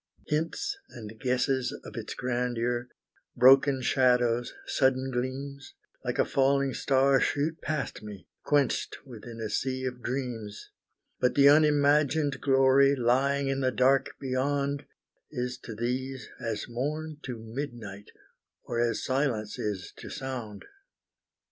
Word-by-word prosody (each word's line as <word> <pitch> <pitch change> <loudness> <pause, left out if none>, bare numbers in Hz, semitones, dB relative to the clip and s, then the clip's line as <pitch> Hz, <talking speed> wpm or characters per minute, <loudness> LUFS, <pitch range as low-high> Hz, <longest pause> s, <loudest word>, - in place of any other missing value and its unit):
Hints 165 - -2
and 110 -3 -10
guesses 130 +1 0
of - - -9
its - - -5
grandeur, 120 -1 -1 0.5
broken 135 +1 +6
shadows, 125 -2 +2
sudden 130 0 +1
gleams, 135 +2 -4 0.3
Like - - -2
a - - +3
falling 140 0 +2
star 135 0 +3
shoot 155 +5 0
past 155 -6 -3
me, 105 -4 -10 0.2
quenched 145 -2 +1
within 115 -2 -10
a 110 - -2
sea 130 +4 -2
of 125 -1 -4
dreams, 120 -5 -5 0.5
But 125 - +2
the 140 0 +7
unimagined 145 -1 +3
glory 135 0 +5
lying 135 +3 +2
in 135 0 0
the 130 -1 +2
dark 130 +2 +2
beyond, 140 +2 -1 0.4
Is 125 -2 -4
to 110 - -6
these 130 +3 -3
as 115 -2 -3
morn 150 +6 -3
to 125 -3 -5
midnight, 110 -4 -7 0.5
or 120 - -3
as 120 -1 0
silence 130 -6 -1
is 100 -4 -4
to - - -9
sound. 120 -6 -6
130 Hz, 125 wpm, -28 LUFS, 120-140 Hz, 0.5 s, the